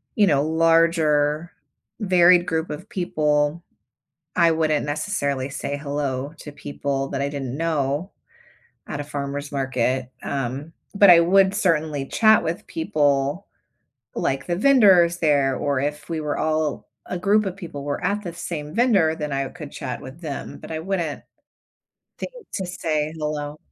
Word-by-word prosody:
you 205 -2 +4
know, 140 -4 +3
larger, 160 -1 +2 0.5
varied 180 -2 +5
group 160 -1 -1
of 180 +8 -7
people, 150 -3 0 0.7
I 170 - +4
wouldn't 155 -2 +1
necessarily 145 -4 -2
say 140 0 -4
"hello" 140 -1 -3
to 150 - -8
people 140 -1 -3
that 135 - -3
I 140 - 0
didn't 135 -2 -5
know 155 +1 -1 0.8
at 145 - -5
a - - -2
farmer's 145 0 -5
market, 130 -2 -1
um, 135 +4 -4 0.2
but 200 -2 +8
I 170 - +9
would 190 +3 +4
certainly 160 -8 0
chat 220 - +4
with 165 +2 -3
people 145 +1 0 0.7
like 135 0 -1
the 175 - 0
vendors 195 -9 +5
there, 140 -5 +2
or 140 -2 0
if 150 +1 -3
we 165 -2 -2
were 150 -1 -2
all, 155 -1 -1 0.2
a 180 - -4
group 205 +3 +2
of 190 0 -4
people 165 -7 -7
were 145 0 -3
at 200 +3 0
the 175 -4 -6
same 165 -3 -6
vendor, 195 -9 +3
then 150 -2 -3
I 135 0 -1
could 150 -3 -10
chat 125 -2 -5
with 135 +6 -11
them, 150 -5 -6
but - - -11
I 160 - -3
wouldn't 170 -3 -3 1.0
think - - -6 0.2
to 190 - -2
say 155 -3 -2
"hello". 150 -1 -4
155 Hz, 155 wpm, -23 LUFS, 145-175 Hz, 1.0 s, I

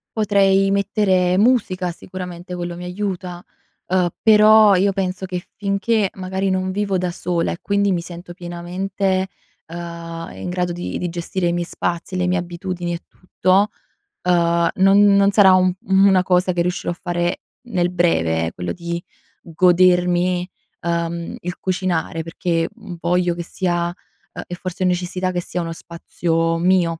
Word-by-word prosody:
Potrei 195 -2 +3
mettere 190 -2 +2
musica, 200 -5 +2
sicuramente 180 0 -8
quello 175 -1 -4
mi 175 +1 -7
aiuta, 180 -2 -4 0.4
uhm, 180 -1 +2
però 215 -1 +7
io 195 +2 +3
penso 190 -1 -2
che 180 -1 -4
finché 200 +1 0
magari 190 +1 -2
non 185 0 0
vivo 200 0 0
da 180 -1 -1
sola 175 -1 -1
e - - -6
quindi 200 0 +1
mi 175 -2 0
sento 175 0 -9
pienamente, 185 +2 -2 0.4
ehm, 170 0 -7
in - - -6
grado 180 0 -1
di 175 +1 -4
di 175 - -3
gestire 175 +1 -2
i 170 - +1
miei 175 0 -1
spazi, 170 +1 -3
le 180 0 0
mie 180 +1 +1
abitudini 175 0 -4
e 170 - -5
tutto, 185 +2 +1 0.5
ehm, 170 -1 +2
non 195 +2 +5
non 200 0 +4
sarà 195 -2 +6
un 185 0 +4
u 190 - -4
una 190 -1 +5
cosa 180 0 +2
che 175 - 0
riuscirò 180 0 -1
a - - -5
fare 175 -1 -1 0.3
nel 180 -5 +1
breve, 85 - +1
ehm, - - -1
quello 90 - -4
di 170 0 -4 0.4
godermi, 180 +1 +3 0.3
ehm, 170 0 -2
il 180 0 -5
cucinare, 180 -3 -1
perché, 165 0 -1
mhmm, 210 -7 -10
voglio 175 0 +1
che 170 0 -5
sia, 175 -1 -1 0.5
ehm, - - -6
e - - -8
forse 185 +1 -5
necessità 180 +1 -1
che 180 -1 -2
sia 175 - -4
uno 165 -1 -4
spazio 165 0 -2
mio. 175 -2 +2
180 Hz, 160 wpm, -20 LUFS, 175-190 Hz, 0.5 s, però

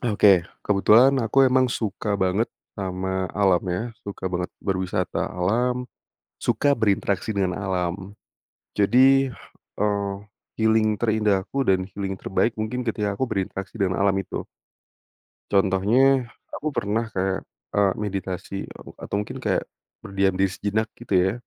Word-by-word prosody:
Ah, 120 -4 -1
oke. 95 -4 +5 0.2
Kebetulan 110 +6 +5
aku 115 +5 0
emang 130 0 +3
suka 105 -2 -2
banget 100 +3 +1 0.3
sama 95 0 -2
alam 95 -3 +4
ya 90 +4 -1 0.2
suka 100 -2 -7
banget 90 0 -2
berwisata 95 -2 -1
alam, 120 +7 0 0.5
suka 145 -1 +2
berinteraksi 100 -2 0
dengan 95 -2 0
alam. 95 0 -3 0.6
Jadi, 130 +6 +5 0.5
eee, 100 -1 +1 0.5
healing 110 -1 +3
terindah 105 -4 +2
aku 135 0 -2
dan 95 -1 +3
healing 95 -1 -4
terbaik 105 +5 0
mungkin 115 +4 -2
ketika 105 -3 -1
aku 130 - 0
berinteraksi 95 +1 -4
dengan 95 -2 0
alam 100 -1 +3
itu. 95 - -5 1.0
Contohnya, 110 +7 +3 0.2
aku 155 - -3
pernah 110 -2 -1
kayak, 95 0 -1 0.3
eee, 100 -2 +3
meditasi, 95 -2 -4 0.2
eee, - - -12
atau - - -5
mungkin 105 - -5
kayak - - 0 0.3
berdiam 95 -1 0
di 95 - +4
sejenak 105 +4 -1
gitu 115 -4 -5
ya. 95 - +1
100 Hz, 135 wpm, -24 LUFS, 95-110 Hz, 1.0 s, oke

